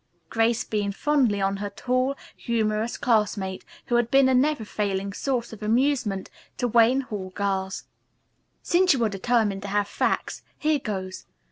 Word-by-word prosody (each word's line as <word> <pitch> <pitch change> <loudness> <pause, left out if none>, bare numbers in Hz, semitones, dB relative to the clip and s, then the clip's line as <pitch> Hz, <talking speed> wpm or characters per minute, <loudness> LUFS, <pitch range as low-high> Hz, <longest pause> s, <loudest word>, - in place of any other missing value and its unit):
Grace 225 0 +2
beamed 205 -2 -2
fondly 260 -8 +2
on 195 0 0
her 205 +1 -4
tall, 255 +6 0 0.2
humorous 220 -1 -1
classmate 210 -5 0 0.2
who 240 -3 +1
had 240 -1 +1
been 270 0 +5
a 260 - +3
never 260 -2 +2
failing 200 -2 -2
source 245 -1 -2
of 220 - -11
amusement 230 -3 +1 0.3
to 245 - -1
the - - 0
Wayne 235 +3 +4
Hall 205 -7 -6
girls. 195 -1 -2 0.8
"Since 365 0 +4
you 250 -4 0
are 220 - +2
determined 205 0 0
to 200 - -6
have 205 0 0
facts, - - -1 0.2
here 305 -1 +1
goes. 190 -5 -5
220 Hz, 160 wpm, -25 LUFS, 200-250 Hz, 0.8 s, been